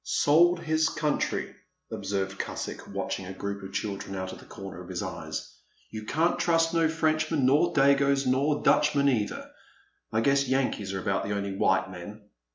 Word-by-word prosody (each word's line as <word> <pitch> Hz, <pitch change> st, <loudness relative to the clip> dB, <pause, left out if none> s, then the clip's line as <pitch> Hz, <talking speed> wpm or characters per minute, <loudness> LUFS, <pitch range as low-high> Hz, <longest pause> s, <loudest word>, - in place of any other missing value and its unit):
Sold 170 Hz, -, +4 dB
his 160 Hz, -1 st, +1 dB
country,*' 150 Hz, -1 st, -1 dB, 0.4 s
observed 95 Hz, -1 st, -3 dB
Cusick, -, -, -5 dB
watching 95 Hz, -, -4 dB
a 95 Hz, -, -6 dB
group 100 Hz, 0 st, -4 dB
of 95 Hz, 0 st, -8 dB
children 100 Hz, -2 st, -4 dB
out 95 Hz, 0 st, -4 dB
of -, -, -10 dB
the -, -, -14 dB
comer -, -, -8 dB
of -, -, -11 dB
his -, -, -3 dB
eyes -, -, -6 dB
— -, -, -39 dB
*' -, -, -34 dB
you 110 Hz, -1 st, -6 dB
can*t 160 Hz, +8 st, +1 dB
trust 165 Hz, -1 st, +2 dB
no 165 Hz, -1 st, +3 dB
Frenchman 155 Hz, -2 st, +1 dB
nor 150 Hz, +6 st, +4 dB
dagoes 140 Hz, 0 st, +4 dB
nor 140 Hz, +4 st, +1 dB
Dutchmen 145 Hz, -2 st, +3 dB
either. 115 Hz, -7 st, -1 dB, 0.6 s
I 110 Hz, -, +1 dB
guess 140 Hz, +2 st, +3 dB
Yankees 130 Hz, -7 st, 0 dB
are 95 Hz, -, -2 dB
about 95 Hz, +1 st, -1 dB
the 100 Hz, -, -2 dB
only 100 Hz, -1 st, -3 dB
white 95 Hz, 0 st, +2 dB
men. 105 Hz, +4 st, -9 dB
135 Hz, 180 wpm, -27 LUFS, 100-155 Hz, 0.6 s, Sold